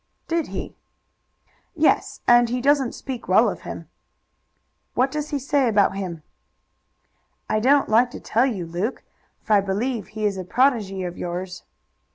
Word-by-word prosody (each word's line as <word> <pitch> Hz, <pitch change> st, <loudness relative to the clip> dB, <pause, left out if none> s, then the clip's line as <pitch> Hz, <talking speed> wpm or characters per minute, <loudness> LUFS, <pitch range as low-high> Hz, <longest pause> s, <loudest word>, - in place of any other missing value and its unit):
"Did 335 Hz, -1 st, -1 dB
he?" -, -, -6 dB, 1.0 s
"Yes, 315 Hz, -1 st, +1 dB
and 240 Hz, -1 st, +6 dB
he 250 Hz, +1 st, -1 dB
doesn't 275 Hz, -1 st, +2 dB
speak 260 Hz, -3 st, -7 dB
well -, -, +5 dB
of -, -, -3 dB
him." -, -, -8 dB, 1.1 s
"What 260 Hz, +2 st, +2 dB
does 300 Hz, +1 st, -3 dB
he 290 Hz, -, -1 dB
say 275 Hz, 0 st, +1 dB
about 205 Hz, -3 st, +3 dB
him?" 175 Hz, -5 st, -5 dB, 1.2 s
"I 215 Hz, -, +1 dB
don't 275 Hz, +5 st, +4 dB
like 235 Hz, +3 st, +4 dB
to -, -, -9 dB
tell 235 Hz, +4 st, +1 dB
you, 195 Hz, -9 st, -3 dB
Luke, 180 Hz, +9 st, -3 dB, 0.4 s
for 220 Hz, -, +1 dB
I 205 Hz, -, +5 dB
believe 205 Hz, +3 st, -2 dB
he 215 Hz, 0 st, -4 dB
is 200 Hz, -2 st, 0 dB
a -, -, -4 dB
protégé 200 Hz, -4 st, +1 dB
of 175 Hz, -, -8 dB
yours." 180 Hz, +1 st, -5 dB
230 Hz, 160 wpm, -23 LUFS, 195-265 Hz, 1.2 s, and